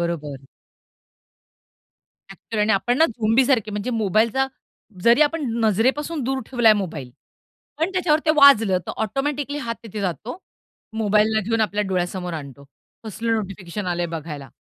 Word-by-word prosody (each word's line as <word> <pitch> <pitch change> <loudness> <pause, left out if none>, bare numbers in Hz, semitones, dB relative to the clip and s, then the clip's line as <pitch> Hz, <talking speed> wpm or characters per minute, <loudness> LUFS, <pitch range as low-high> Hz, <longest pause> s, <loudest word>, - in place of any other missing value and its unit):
बरोबर. 150 -6 -4 1.9
एक्चुअली 220 -2 -5
आणि 215 - +2
आपण 240 +6 +1
ना 325 - +6
झोंबीसारखे, 230 0 +1
म्हणजे 210 +4 -3
मोबाईलचा 225 +4 +1 0.6
जरी 235 +5 +5
आपण 305 +1 0 0.2
नजरेपासून 265 - +1
दूर 265 +1 -1
ठेवलाय 240 -4 +4
मोबाईल, 160 -11 -4 0.7
पण 330 +4 0
त्याच्यावर 325 -4 +2
ते - - +5
वाजलं, 225 -10 +6
तर - - -4
ऑटोमॅटिकली 285 +5 -2
हात 230 -5 -4
तिथे 215 -2 -7
जातो. 200 - -4 0.6
मोबाईलला 215 0 +2
घेऊन 225 +2 -1
आपल्या 210 -1 0
डोळ्यासमोर 180 -1 -2
आणतो, 140 -2 -9 0.4
कसलं 225 +2 -2
नोटिफिकेशन 195 -1 -5
आलंय 175 -1 -1
बघायला. 150 -3 -8
220 Hz, 130 wpm, -22 LUFS, 185-260 Hz, 1.9 s, ना